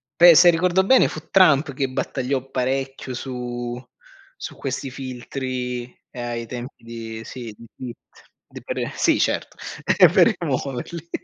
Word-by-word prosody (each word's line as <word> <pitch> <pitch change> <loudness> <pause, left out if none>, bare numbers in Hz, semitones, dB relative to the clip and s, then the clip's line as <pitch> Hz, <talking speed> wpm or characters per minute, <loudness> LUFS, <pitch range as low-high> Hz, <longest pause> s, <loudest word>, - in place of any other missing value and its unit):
Beh, 175 +1 +8
se 175 +3 +8
ricordo 180 +2 +3
bene 260 +5 +6
fu 155 - -8
Trump 155 -6 +5
che 135 +1 -1
battagliò 130 0 -2
parecchio 135 0 -2
su 120 -1 -5 0.5
su - - -7
questi 135 0 -4
filtri, 125 -1 -4 0.3
ehm, 120 -1 -6
ai 115 -1 -4
tempi 125 +2 -8
di 115 -1 -7
sì, 115 -3 -8
di 115 - -13
Twitter. 125 -2 -11 0.2
D - - -11
per - - -3
sì, - - +3
certo, - - -1 0.6
per - - +5
rimuoverli. 150 +6 -4
130 Hz, 140 wpm, -22 LUFS, 120-140 Hz, 0.6 s, Beh